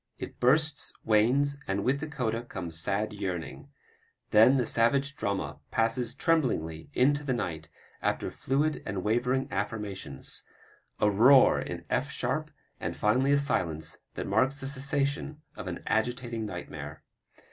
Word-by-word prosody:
It - - -8
bursts, 150 +4 +3
wanes, 125 +7 +3
and 95 +1 -1
with 135 +2 +1
the 155 - -4
coda 115 -6 -2
comes 85 -8 -5
sad 100 +4 -1
yearning, 95 -5 -5 0.6
then 115 +6 +7
the 125 - +1
savage 135 +6 +2
drama 90 - -3
passes 115 +1 +1
tremblingly 115 - 0
into 145 +3 +3
the 130 -3 0
night 85 -9 -4 0.3
after - - -1
fluid 145 +4 0
and 95 -2 -4
wavering 125 +4 +1
affirmations; 100 -8 -4 0.6
a 105 - +4
roar 125 +6 +6
in - - -5
F 135 +3 +1
sharp 150 +2 -2 0.3
and - - -4
finally 130 +6 +3
a 145 - +5
silence 80 - -1 0.2
that - - -3
marks 135 +2 +2
the 135 - -4
cessation 140 +2 -1
of - - -7
an - - -5
agitating 115 0 -1
nightmare. - - -7
120 Hz, 140 wpm, -29 LUFS, 105-140 Hz, 0.6 s, then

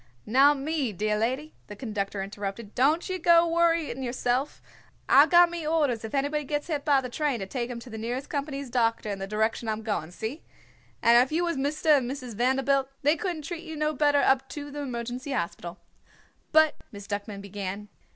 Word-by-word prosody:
"Now, 275 +6 +5
me 280 -3 -2
dear 210 +2 -1
lady," 260 +8 -2
the 205 - -8
conductor 200 -3 -3
interrupted, 200 +1 -6
"don't 300 +7 +2
ye 370 -1 -3
go 340 0 +5
worritin' 330 -5 +1
yerself. 250 +2 -1 0.5
I've - - +7
got 345 -1 +6
me 340 -1 -5
orders 290 -8 +1
if 220 +4 -5
anybody 290 +2 0
gets 290 +1 -2
hit 300 -4 -3
be 295 - +3
the - - -3
train 280 +1 -1
to 195 - -5
take 240 +4 -4
him 240 -1 -5
to 250 - -11
the 220 - -6
nearest 245 +4 -3
company's 280 -3 -4
doctor 230 -3 +1
in 195 - -4
the 195 - -4
direction 220 +2 -1
I'm 220 0 -3
goin'. 205 -7 -2
See? 225 - -5 0.6
And 235 +1 +7
if 260 - -7
you 335 +3 +1
was 340 -1 0
Mister 290 +4 -1
and 280 -5 +5
Missus 255 -2 -6
Vanderbilt, 265 +3 +1
they 295 +3 +4
couldn't 345 -5 -4
treat 340 +2 -6
you 320 -1 -7
no 305 0 0
better 290 0 +3
up 265 0 +2
to 290 -1 -7
the 290 - -6
Emergency 250 +1 -4
Hospital." 170 -4 -4 0.7
"But 315 -1 +5
" - - -38
Miss 200 -1 -9
Duckman 205 0 -5
began. 200 +1 -6
265 Hz, 200 wpm, -27 LUFS, 220-300 Hz, 0.7 s, I've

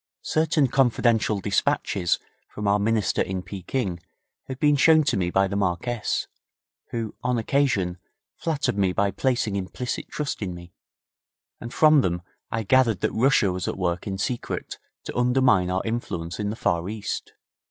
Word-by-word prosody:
Certain 155 -2 +2
confidential 120 -5 +2
despatches 95 -2 +1 0.3
from 105 0 -4
our 100 +1 +3
Minister 105 -1 +1
in 95 -1 -2
Pekin 95 -1 -3 0.5
had 130 - -5
been 145 +1 +4
shown 155 +2 +5
to 140 - +1
me 90 -3 0
by 95 +2 +2
the 100 - -4
Marquess, 100 +4 -1 0.6
who, 115 -2 -4
on 125 -1 0
occasion, 110 -8 +1 0.4
flattered 150 -10 -1
me 95 -2 +2
by 100 +1 +1
placing 120 -5 0
implicit 100 +6 -4
trust 150 -5 -3
in 90 -4 -3
me, 85 0 -12 0.9
and 120 - -7
from 155 0 +5
them 85 -5 -1 0.3
I 115 0 -2
gathered 115 -1 +3
that - - +1
Russia 115 -4 +3
was 90 0 -3
at - - -3
work 90 +1 -1
in 95 -1 -3
secret 120 +4 -3 0.2
to - - -7
undermine 125 -6 +3
our 95 +1 0
influence 90 -7 -3
in 105 -1 -1
the 105 - -3
Far 85 -4 0
East. 105 -1 -5
105 Hz, 160 wpm, -25 LUFS, 95-125 Hz, 0.9 s, shown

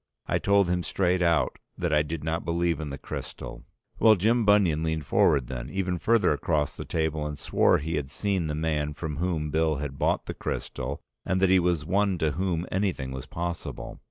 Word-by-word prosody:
I - - 0
told 100 -1 +3
him 90 0 +1
straight 90 0 0
out 85 -3 +2 0.2
that 85 -2 -1
I 75 - +5
did 75 0 -4
not 80 +1 -1
believe 85 0 0
in 75 -2 -4
the 70 - -5
crystal. - - -7 0.3
Well, 110 -1 +7
Jim 110 +4 +2
Bunion 100 -7 +4
leaned 80 -2 -1
forward 70 -1 +3
then, 60 -1 -6
even 90 -2 -1
further 115 +3 +3
across 75 -6 0
the - - -6
table, 80 -2 -1
and 75 -1 -5
swore - - +3
he 80 +2 -2
had 70 -2 -3
seen 95 +1 -1
the 75 - -2
man 75 -2 -1
from 75 -3 -4
whom 80 -3 -1
Bill 80 0 +2
had 70 -1 -5
bought - - +1
the - - -4
crystal 65 +3 -4 0.2
and 95 +1 0
that 95 -1 +4
he 95 - +6
was 85 -4 +1
one 100 +1 +1
to 80 -2 +1
whom 90 0 -1
anything 95 -9 -1
was 65 -1 -6
possible. 85 0 -5
80 Hz, 205 wpm, -27 LUFS, 75-90 Hz, 0.3 s, Well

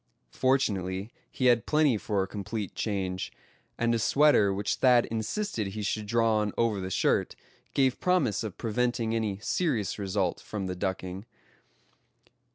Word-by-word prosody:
Fortunately 100 -6 0 0.2
he 130 - -2
had 120 -3 +4
plenty 150 -5 +3
for 105 -2 -1
a - - -5
complete 105 0 -5
change, 95 -3 -2 0.5
and 120 0 +1
a 115 - +1
sweater 140 -5 +4
which 100 +1 -1
Thad 125 -2 +5
insisted 115 - -2
he 105 +2 -5
should 105 +1 -2
draw 115 0 +2
on 105 -1 -1
over 115 -4 +1
the 95 - -4
shirt, - - +1 0.4
gave 130 -2 +2
promise 165 - +1
of 105 -5 -6
preventing 115 0 -1
any 110 -4 -1
serious 125 - 0
result 95 -2 -1
from 105 -3 -5
the 90 0 -3
ducking. 95 +2 -4
110 Hz, 150 wpm, -28 LUFS, 100-120 Hz, 0.5 s, Thad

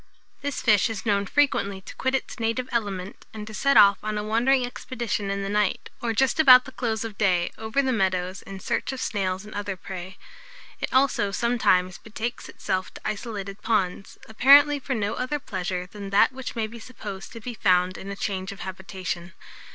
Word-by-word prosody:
This 285 -1 -3
fish 210 -2 +4
is 220 -1 -5
known 200 -2 +1
frequently 200 -9 +1
to - - -10
quit 260 +1 0
its 265 - -4
native 230 +3 -1
element, 200 -5 -3
and 210 -1 -6
to 220 - -9
set 275 +5 +3
off 200 -1 +7
on 215 0 -3
a 210 - -2
wandering 245 +4 +2
expedition 235 -4 -4
in 200 0 -2
the - - -3
night, 205 -1 0
or 235 - 0
just 265 +7 +1
about 255 -4 +8
the 260 - -9
close 225 -4 -2
of 215 -3 -8
clay, 180 -4 +2
over 220 +5 -1
the 260 -1 +1
meadows, 185 -3 0
in 195 0 -9
search - - -2
of 265 - -6
snails 190 -4 -2
and 215 - -10
other 205 -2 -4
prey. 185 +1 -8 0.6
It - - -3
also, 260 -6 +3
sometimes, 190 -4 +1
betakes 225 +2 -5
itself 185 -2 -3
to - - -10
isolated 205 -2 -4
ponds, 195 -4 -1
apparently 285 +6 +6
for 265 -1 -3
no 210 -1 -1
other 255 +4 -2
pleasure 185 -7 -4
than 200 +1 -8
that 200 +5 +5
which 260 -1 -7
may 225 -2 0
be 230 +2 -9
supposed 210 -5 -8
to 230 - -8
be 240 +2 -6
found 185 -3 +2
in 195 - -8
a 200 - -4
change 195 0 -3
of 200 - -10
habitation. 185 -1 -5
210 Hz, 200 wpm, -25 LUFS, 190-240 Hz, 0.6 s, about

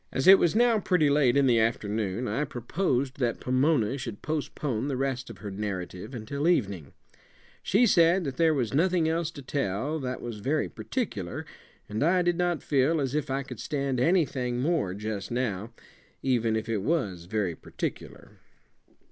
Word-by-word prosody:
As 135 - -1
it 190 +1 +9
was 170 +3 +2
now 235 -1 +4
pretty 180 -7 +2
late 140 -3 +3
in 140 - +4
the 120 -3 +4
afternoon, 110 0 -1
I 115 +8 0
proposed 135 0 -2
that 120 -3 0
Pomona 130 -1 +1
should 115 -5 -7
postpone 145 -5 -2
the 135 -3 -2
rest 135 -1 -2
of - - -9
her 105 -2 -7
narrative 95 +2 -5
until 140 +7 -3
evening. 100 - 0 0.7
She 215 +6 +3
said 175 -2 +4
that 135 -4 -4
there 160 -2 +4
was 125 -4 -1
nothing 170 +2 +2
else 165 0 0
to 145 -4 -10
tell 135 +3 -2
that 130 -2 -4
was 115 -3 -6
very 145 +8 0
particular; 105 - -4 0.4
and 105 +1 -4
I 175 +4 +3
did 175 0 +1
not 175 -3 0
feel 145 +3 +2
as 135 -2 -1
if 150 -1 -1
I 135 +1 -1
could 125 -4 -9
stand 140 -3 -2
anything 130 -6 +1
more 140 - 0
just 105 -1 -4
now, 115 -3 -2 0.5
even 115 -4 +1
if 110 0 -2
it 110 -3 -1
was 100 - -1
very 95 -2 -1
particular. - - -7
130 Hz, 175 wpm, -27 LUFS, 110-155 Hz, 0.7 s, it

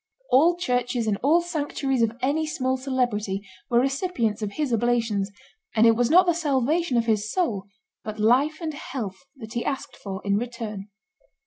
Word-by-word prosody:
All 330 +7 +5
churches 245 -6 0
and 210 -2 +1
all 310 +9 +3
sanctuaries 290 -6 -1
of 230 +1 +1
any 305 +4 +1
small 260 -4 0
celebrity 240 -7 -1 0.2
were 235 - +4
recipients 270 - 0
of 205 -1 -3
his 295 -5 -1
oblations, 225 -4 +1 0.5
and 220 +1 +5
it 230 -1 +6
was 240 +1 +2
not 365 +3 +7
the 345 - +3
salvation 300 -1 +1
of 230 - +2
his 215 -2 0
soul, 225 - 0 0.4
but 215 0 -6
life 255 +8 +3
and 315 -2 -3
health, 240 -9 -5 0.2
that 220 -4 -10
he 235 - -1
asked 275 -2 -4
for 195 -2 -6
in 200 0 +2
return. 225 -4 -5
245 Hz, 175 wpm, -25 LUFS, 220-285 Hz, 0.5 s, not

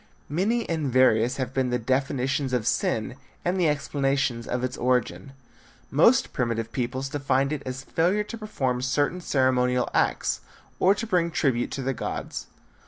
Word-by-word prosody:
Many 210 +10 0
and 155 -5 -1
various 125 -1 +4
have 130 -1 -3
been 130 -2 +1
the 125 - +1
definitions 130 +2 0
of 120 -4 0
sin 115 +3 0 0.3
and 180 +2 +1
the 170 -3 +3
explanations 135 -4 0
of 125 0 -2
its 130 0 -2
origin. 125 -3 -1 0.6
Most 235 - +4
primitive 115 -2 -1
peoples 130 +2 -2
defined 135 0 0
it 150 - -3
as 130 +1 -5
failure 180 +9 +1
to 230 +2 -7
perform 130 - -2
certain 145 +7 0
ceremonial 125 -4 +2
acts, - - +1 0.4
or 195 +2 +5
to 225 - -3
bring 180 -6 +1
tribute 130 -7 0
to 135 0 -3
the 135 +1 0
gods. - - -5
135 Hz, 160 wpm, -26 LUFS, 125-155 Hz, 0.6 s, or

